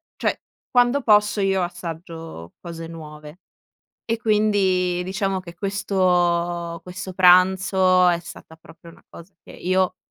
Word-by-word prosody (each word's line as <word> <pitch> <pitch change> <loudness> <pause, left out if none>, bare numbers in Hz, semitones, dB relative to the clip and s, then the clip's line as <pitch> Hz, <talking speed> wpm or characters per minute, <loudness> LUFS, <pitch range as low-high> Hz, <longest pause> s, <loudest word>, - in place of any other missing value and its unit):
cioè, - - -2 0.3
quando 245 +3 +3
posso 210 -1 +3
io 195 -1 +1
assaggio 165 - -8
cose 165 -1 -8
nuove 150 0 -11 0.7
e 230 0 -2
quindi 195 -5 +1
diciamo 195 +1 -2
che 170 -2 -12
questo 175 -3 0
questo 185 +2 -8
pranzo 185 0 +4
è 175 -1 +2
stata 160 -1 -13
proprio 165 +1 -16
una - - -21
cosa 170 +4 -14
che - - -16
io, 185 0 0
180 Hz, 125 wpm, -22 LUFS, 170-195 Hz, 0.7 s, pranzo